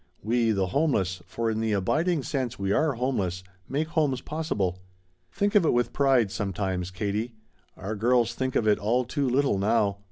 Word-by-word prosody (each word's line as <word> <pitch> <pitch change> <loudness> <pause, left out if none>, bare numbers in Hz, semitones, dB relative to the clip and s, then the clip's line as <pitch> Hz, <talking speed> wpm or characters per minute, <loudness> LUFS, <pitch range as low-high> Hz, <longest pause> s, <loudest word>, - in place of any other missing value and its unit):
We, 115 +2 +1
the 100 -3 +1
homeless, 95 - 0
for 115 +4 -2
in 110 - -2
the 110 -1 0
abiding 155 - +1
sense 130 -5 -2
we 100 0 -1
are 155 +6 +2
homeless, 100 -8 -2 0.3
make 155 +3 -1
homes 150 -6 +1
possible. 105 - -2 0.5
Think 205 0 0
of 205 - +5
it 160 - +3
with 120 0 0
pride 130 -7 +3
sometimes, 95 -3 -2
Katie. 105 +4 -3 0.4
Our 100 +3 -4
girls 120 +2 +2
think 130 +1 -3
of 110 - +2
it 105 - +4
all 120 +5 +1
too 140 +1 -1
little 130 -5 +2
now. 100 -1 +1
115 Hz, 180 wpm, -26 LUFS, 100-135 Hz, 0.5 s, of